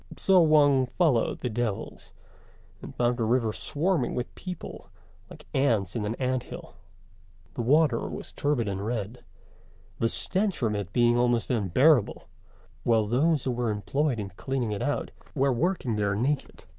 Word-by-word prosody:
So 190 -1 +4
Wang 145 -5 +4
followed 135 -5 +1
the 125 - -2
devils, 110 -3 -4 0.7
and - - -10
found 120 0 +1
the 115 - -1
river 115 -1 +1
swarming 155 - -1
with 125 - -4
people 180 -2 -8 0.4
like - - -13
ants 115 -9 +1
in 110 -3 -2
an 110 - -2
ant 130 0 -1
hill. - - -10 0.8
The - - -3
water 140 0 +2
was - - -7
turbid 145 -6 -1
and 100 0 -3
red, 110 +1 -4 0.8
the 115 - +2
stench 190 - -1
from 110 -4 0
it 100 -3 -4
being 120 +2 +3
almost 120 -1 +1
unbearable, 120 - +2 0.5
while 115 -2 +2
those 140 +6 +1
who 130 - -1
were 120 -1 -1
employed 130 +6 -1
in 100 -2 -4
cleaning 125 +3 -3
it 100 - -3
out 145 - -2 0.2
were 135 -1 +2
working 130 - -1
there 100 -1 0
naked. 135 +7 -2
120 Hz, 155 wpm, -27 LUFS, 110-145 Hz, 0.8 s, So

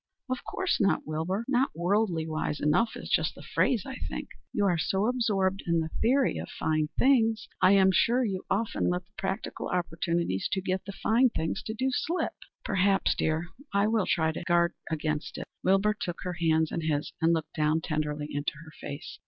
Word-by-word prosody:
"Of 255 - -2
course 370 -8 -1
not, 195 -5 +2
Wilbur. 165 +8 -2
Not 265 0 +2
worldly 175 -1 +1
wise 155 -2 -2
enough 155 +10 +2
is - - -7
just - - +1
the - - -11
phrase, 235 -8 +1
I 265 - -6
think. - - -5 0.2
You 205 - +1
are 175 -4 +2
so 190 +5 +1
absorbed 205 -6 +1
in 170 -1 +3
the 160 0 -3
theory 260 +3 +3
of - - -6
fine 155 -1 0
things 225 -4 +3
that 185 - +7
I 190 - +6
am 190 -1 +6
sure 240 +6 +3
you 190 -4 -2
often 215 +3 0
let 180 0 -1
the - - -37
practical 195 +2 -3
opportunities 170 - -1
to 195 - +1
get 185 0 -2
the 200 - -5
fine 235 +5 +3
things 160 -7 -2
to 220 - -5
do 260 +3 0
slip." 335 +7 -1 0.3
"Perhaps, 195 -1 +2
dear. 160 +2 -1 0.3
I 200 +1 +4
will 215 -2 +1
try 160 -2 +2
to 160 - -6
guard 170 0 +3 0.2
against 155 -1 -2
it." - - -5 0.2
Wilbur 195 +3 +3
took 175 -5 -5
her 180 - -3
hands 160 -2 +2
in 170 - -2
his 150 -2 -1
and 165 +1 +4
looked 160 -2 -1
down 155 0 +2
tenderly 150 -2 -2
into 145 0 -2
her 160 - -12
face. 145 +3 -7
185 Hz, 200 wpm, -28 LUFS, 160-215 Hz, 0.3 s, that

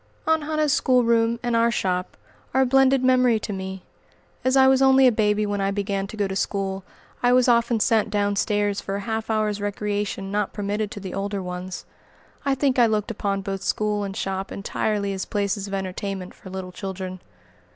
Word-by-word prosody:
Aunt 320 -1 +2
Hannah's 310 -2 +1
schoolroom 235 -3 +3
and 240 -1 0
"our 230 0 +4
shop" 185 -4 -2 0.4
are 265 - +5
a - - +2
blended 270 0 +4
memory 255 -3 +4
to 210 - -4
me. 190 -1 -6 0.6
As 260 +1 +3
I 265 0 +7
was 265 0 +4
only 265 0 +6
a 250 - +7
baby 210 -1 +1
when 205 -1 -2
I 195 - +1
began 200 -1 -2
to 220 - -9
go 205 -1 +1
to 190 - -4
school, 195 -1 -2 0.4
I 245 - +4
was 250 0 +4
often 235 -1 +3
sent 220 -1 +2
down 205 -1 0
stairs 205 -1 0
for 195 - -4
a 200 - -3
half 220 +1 -3
hour's 215 -2 0
recreation 205 -1 -2
not 205 -1 -1
permitted 205 0 -2
to 205 - -7
the 190 -2 -7
older 200 0 -3
ones. 180 0 -6 0.6
I 275 -2 +1
think 265 -1 +1
I 235 - +6
looked 215 +1 -1
upon 200 -2 -2
both 195 -1 -4
school 210 0 0
and 195 0 -5
shop 195 -1 -3
entirely 200 0 -2
as 190 -1 -3
places 200 -1 -2
of 195 - -7
entertainment 190 0 -4
for 190 - -13
little 185 -1 -6
children. 185 0 -6
205 Hz, 200 wpm, -24 LUFS, 195-235 Hz, 0.6 s, I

